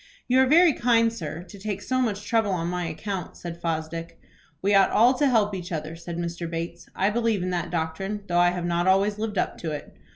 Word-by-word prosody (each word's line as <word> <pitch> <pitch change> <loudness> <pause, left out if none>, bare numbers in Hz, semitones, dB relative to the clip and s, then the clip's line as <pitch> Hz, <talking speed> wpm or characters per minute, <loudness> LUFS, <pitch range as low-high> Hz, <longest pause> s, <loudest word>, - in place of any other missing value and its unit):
"You 255 +1 +4
are 265 - +4
very 330 +3 +6
kind, 230 -2 +3
sir, 165 -4 -6
to 185 +3 -13
take 200 0 -3
so 255 +5 -1
much 210 -4 -1
trouble 225 -1 +1
on 170 -1 -1
my 180 -1 -2
account," 185 +3 -5
said 170 -1 -7
Fosdick. 165 0 -4 0.4
"We 200 +3 +1
ought 195 -1 +6
all 240 +4 +5
to 285 +2 +2
help 210 -4 +2
each 180 -1 -5
other," 155 0 -4
said 170 0 -7
Mr. 170 0 -4
Bates. 170 +1 -5
"I 195 +2 +2
believe 225 -4 +1
in 185 - -2
that 175 -1 -2
doctrine, 180 +5 -3
though 175 0 +2
I 175 0 +5
have 175 -1 -3
not 175 +1 0
always 200 +2 +3
lived 215 -2 -3
up - - -1
to 160 -2 -3
it. 145 - -8
185 Hz, 230 wpm, -25 LUFS, 170-215 Hz, 0.4 s, very